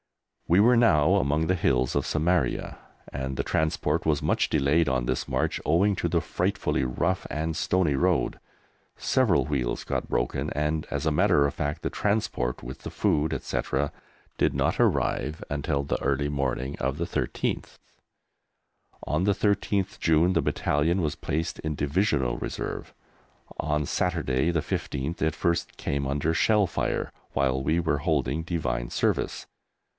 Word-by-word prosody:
We 85 +3 +4
were 120 +4 +6
now 110 -11 +4
among 75 +4 +1
the 95 - +2
hills 65 -7 +1
of - - +1
Samaria 80 -3 0 0.4
and 65 0 -3
the - - 0
transport 80 0 0
was 75 -2 +2
much 75 - +1
delayed 75 +3 +2
on 65 -2 0
this 65 +1 -1
march - - -1
owing 95 +6 +3
to - - -1
the - - +2
frightfully - - -1
rough 85 +9 -1
and 80 +1 -2
stony 85 -2 +1
road. 90 +5 +1 0.6
Several 120 -10 +2
wheels 70 -5 -1
got - - -2
broken - - -1
and, 75 +1 -1
as - - -2
a - - +2
matter 70 - +4
of 70 - -1
fact, 75 +1 -3
the - - 0
transport, 100 - -1
with 65 +2 -7
the - - -7
food, 75 +1 +1
etc., 70 +1 -2 0.5
did - - +3
not - - +1
arrive 75 +2 +1
until 70 -1 -1
the 70 - -2
early 70 +1 +1
morning 70 -1 -2
of 70 +2 -1
the 85 - -1
13th. 85 - -3 1.3
On 75 +4 +1
the 100 +1 +3
13th 100 -1 0
June 80 +3 +3
the - - +2
Battalion 80 +6 +1
was 75 -3 -1
placed 80 +2 -3
in 80 -1 -3
Divisional 70 - +1
Reserve. - - -5 0.7
On 75 -1 0
Saturday 80 -4 0
the 85 -2 +1
15th 70 +4 -3
it 80 -1 +1
first 85 0 -1
came 70 0 -2
under 70 +4 0
shell 105 +4 +3
fire - - -2 0.2
while 65 -1 +1
we 80 +5 +2
were 80 -4 0
holding 75 -1 0
Divine 65 -8 -2
Service. - - -1
75 Hz, 155 wpm, -26 LUFS, 70-85 Hz, 1.3 s, were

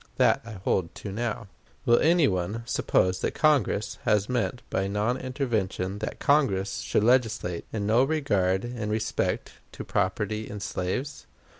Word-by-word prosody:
That - - +4
I 115 -1 -9
hold 95 -3 -1
to 100 - -6
now. 115 +1 -3 0.4
Will 120 - +5
any 165 -1 +4
one 95 +4 -2
suppose 90 -5 +1
that - - -1
Congress 145 -9 +2
then 105 -1 +4
meant 125 0 -1
by 95 0 0
non 105 +5 0
intervention 110 -8 -2
that 110 - -4
Congress 105 -10 +2
should - - 0
legislate 110 -8 +1
in 105 -2 -2
no 115 +4 +4
regard 105 -11 +1
in 120 -3 -4
respect 110 +1 -1 0.2
to - - -6
property 105 +3 -1
in 105 - -6
slaves? 100 +9 -3
110 Hz, 150 wpm, -27 LUFS, 95-125 Hz, 0.4 s, Will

